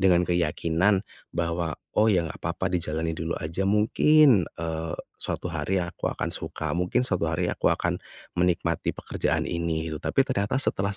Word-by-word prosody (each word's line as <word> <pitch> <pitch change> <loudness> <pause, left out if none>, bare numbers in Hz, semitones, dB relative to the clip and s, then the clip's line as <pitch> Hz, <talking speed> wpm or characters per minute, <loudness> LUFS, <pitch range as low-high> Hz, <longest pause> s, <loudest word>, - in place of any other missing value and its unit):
dengan 90 -2 +5
keyakinan 85 +3 +1 0.3
bahwa, 85 -1 -1 0.2
"Oh 110 +1 +4
ya 90 -6 +3
nggak 80 - -7
apa-apa 85 +3 -2
dijalani 80 -1 -1
dulu 80 +1 -3
aja. 90 +5 -2
Mungkin, 110 - +5
eee, 80 0 -4 0.3
suatu - - -3
hari 95 - -1
aku 85 - -3
akan - - -3
suka, 80 -2 -4
mungkin 90 +9 +1
suatu 90 -8 +1
hari 85 +2 0
aku - - +1
akan, - - 0 0.3
menikmati 85 -1 0
pekerjaan - - -1
ini," 85 -1 -2
gitu 75 - -5
tapi 135 - +2
ternyata 100 -1 0
setelah 100 -7 +1
85 Hz, 160 wpm, -26 LUFS, 80-95 Hz, 0.3 s, dengan